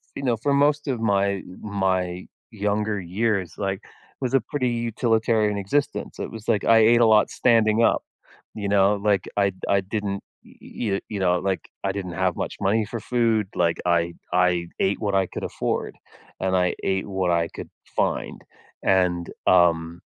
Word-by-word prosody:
you - - -5
know, 125 -3 +2
for 140 +5 0
most 145 +1 +2
of 125 -4 -1
my 100 -3 +1 0.2
my 95 -3 -1 0.2
younger 105 0 -1
years, 95 +1 -1
like, 95 -1 -2 0.4
was 130 -2 -2
a 135 - +4
pretty 130 +2 -2
utilitarian 115 -2 +1
existence, 145 +9 -2
it - - -4
was 110 -1 -10
like, 105 - +1
I 115 0 +6
ate 115 +2 +5
a 115 - +6
lot 110 -1 +5
standing 115 -2 +3
up, - - +3 0.5
you 100 -2 -4
know? 100 0 +4
Like, 100 -3 +1
I 100 -1 +2 0.2
I 100 0 +3
didn't 100 0 -3 0.2
y 115 - -6
y 100 - 0
you 105 - -4
know, 90 -1 +2
like, 95 0 -2
I 100 - 0
didn't 95 -3 -5
have 90 -2 +1
much - - -4
money 105 +3 +2
for 115 +3 -6
food, 115 -3 +1
like, 85 -1 +1
I 85 -1 +1 0.2
I 90 -1 +2
ate 95 +1 +1
what 100 -2 -1
I 95 -1 +2
could - - -7
afford, - - -3 0.4
and 95 0 0
I 90 -1 +2
ate 95 0 0
what 95 -3 0
I 85 -1 +1
could - - -9 0.3
find, - - -1 0.4
and, 90 -2 +2 0.2
um 85 -2 +3
100 Hz, 175 wpm, -24 LUFS, 95-115 Hz, 0.5 s, I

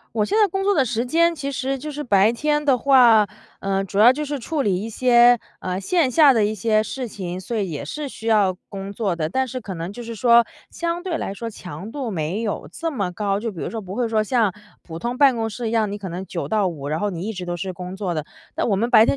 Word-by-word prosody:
我 210 - +2
现 420 - -1
在 420 -2 +5
工 385 +2 -2
作 405 0 +3
的 275 -5 +3
时 235 +1 -1
间， 335 +5 +3
其 280 -1 -4
实 270 0 -2
就 300 +3 -6
是 295 +1 -4
白 210 -2 +4
天 295 +4 0
的 270 -3 +4
话， 240 -5 +6 0.4
呃， 195 0 -1
主 195 +2 -1
要 240 +4 +8
就 300 +3 -3
是 290 -2 -4
处 310 +4 -2
理 200 -3 +1
一 225 - -5
些， 245 0 +5 0.2
呃， 185 0 -3
线 310 - +1
下 285 +1 +6
的 225 -3 +2
一 210 - 0
些 215 +1 +1
事 255 +3 -5
情， 185 -4 -6
所 225 +5 -4
以 195 -5 -1
也 145 -2 -5
是 295 - -5
需 225 - -10
要 205 -4 +4 0.2
工 195 0 -6
作 200 -4 -1
的。 155 -2 -2
但 260 +7 0
是 255 +1 -5
可 195 -2 -7
能 170 +3 -5
就 240 - -8
是 230 0 -7
说， 235 +1 +5 0.2
相 340 0 -3
对 350 -3 -1
来 195 - -3
说 230 +3 -5
强 185 +1 -8
度 265 -6 -4
没 175 +5 -2
有 210 - -3
这 330 -1 -3
么 200 - -2
高， 200 +1 -1
就 225 0 -4
比 170 - -8
如 - - -3
说 225 - -4
不 190 -1 -8
会 240 0 0
说 220 -1 +2
像 220 -4 +2 0.3
普 165 -1 -8
通 240 +4 -3
办 270 -3 +5
公 225 0 -1
室 230 +1 -4
一 - - -3
样， 220 -3 +1
你 - - -3
可 200 -2 -6
能 180 +3 -6
9 - - -4
到 215 -3 +2
5， 150 -6 -4
然 155 +2 -1
后 205 +1 -1
你 170 -2 -5
一 220 - -2
直 180 -2 -6
都 175 0 -3
是 185 +2 -4
工 180 +1 -7
作 190 -3 -3
的。 155 -2 -3 0.3
那 - - 0
我 205 - +2
们 230 +5 0
白 225 -2 +7
天 - - +2
220 Hz, 295 characters per minute, -22 LUFS, 195-255 Hz, 0.4 s, 要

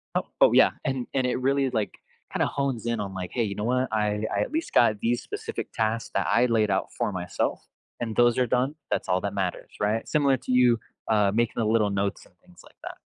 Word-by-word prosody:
Oh - - 0
oh, - - +7
yeah, - - +6
and 130 -2 -2
and 130 -2 +1
it 125 - 0
really, 135 +1 +2
like, 110 -4 -2 0.3
kinda - - +1
hones 135 -5 -2
in 115 -2 -1
on, 100 -2 -4
like, 90 -1 -5
"Hey, 120 - 0
you 100 -2 -3
know 105 - -4
what? 125 +1 +1
I 105 0 0
I - - +1
at - - -2
least 320 +1 -3
got 110 -3 +4
these 120 +1 0
specific 440 +2 -6
tasks 110 +1 -1
that - - +1
I 120 +2 +3
laid 110 -3 +2
out 95 - -1
for - - -1
myself, 90 -1 -2 0.4
and 115 -2 -3
those 120 0 +4
are 125 - +2
done. 130 +5 0 0.2
That's - - -1
all 90 0 +2
that - - -3
matters." - - -3
Right? 105 +2 0
Similar 140 -3 +3
to 130 - -6
you, 125 -2 +4 0.3
uh, 105 -2 +3
making 115 0 +1
the 115 - +1
little 110 -2 +2
notes 100 0 -2
and 90 - -24
things 90 - -19
like - - -19
that. - - -7
115 Hz, 240 wpm, -26 LUFS, 105-125 Hz, 0.4 s, oh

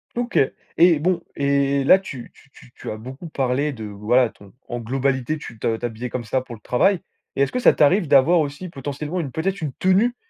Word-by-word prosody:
OK 240 0 0 0.4
et 170 -2 +6
bon 175 +2 +1
et 140 0 +1
là 185 +8 +6
tu 135 -10 -9
tu - - -22
tu 125 - -18
tu - - -8
as 110 - -4
beaucoup 130 +9 -9
parlé 140 +1 0
de, 110 -4 -8
voilà, 110 +4 +1
ton 100 -2 -18
en 120 - -4
globalité, 130 +4 -1
tu 115 -7 -10
te 115 - 0
t'habillais 120 +1 -5
comme 125 0 -4
ça 130 +4 -1
pour 125 -2 -9
le 105 - -18
travail 180 - +2 0.4
et 135 - +3
est-ce 140 - -1
que - - -1
ça 245 - +6
t'arrive 165 +5 +3
d'avoir 145 +5 +5
aussi 150 +4 -3
potentiellement 145 +3 -5
une 145 -6 -4
peut-être 190 +7 -2
une 150 -4 -3
tenue, 195 - +2
140 Hz, 215 wpm, -22 LUFS, 125-165 Hz, 0.4 s, et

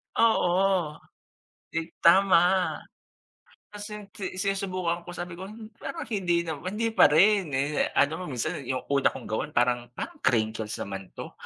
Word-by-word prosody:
Oo, 185 -7 +2 0.7
'di 165 0 -4
tama. 180 0 +5 1.0
Kasi 210 0 -7
si 190 -2 -6
sinusubukan 185 -3 -1
ko, 175 +1 -10
sabi 175 0 -5
ko, 185 +3 -8
"Hmm, 220 +1 -11
parang - - -5
hindi 180 -6 0
nam 160 -3 -5
hindi 225 +3 -1
pa - - +7
rin." 190 +3 +4
Eh, 145 +2 0
ano 155 +5 +2
nga 180 - -5
minsan 125 +1 -3
yung 130 -1 -2
una 140 -1 +4
kong 130 - -8
gawan 110 - -3
parang 120 0 +2
parang - - -6
crinkles 110 -3 0
naman 95 -2 -6
'to. - - -7
175 Hz, 150 wpm, -27 LUFS, 140-195 Hz, 1.0 s, pa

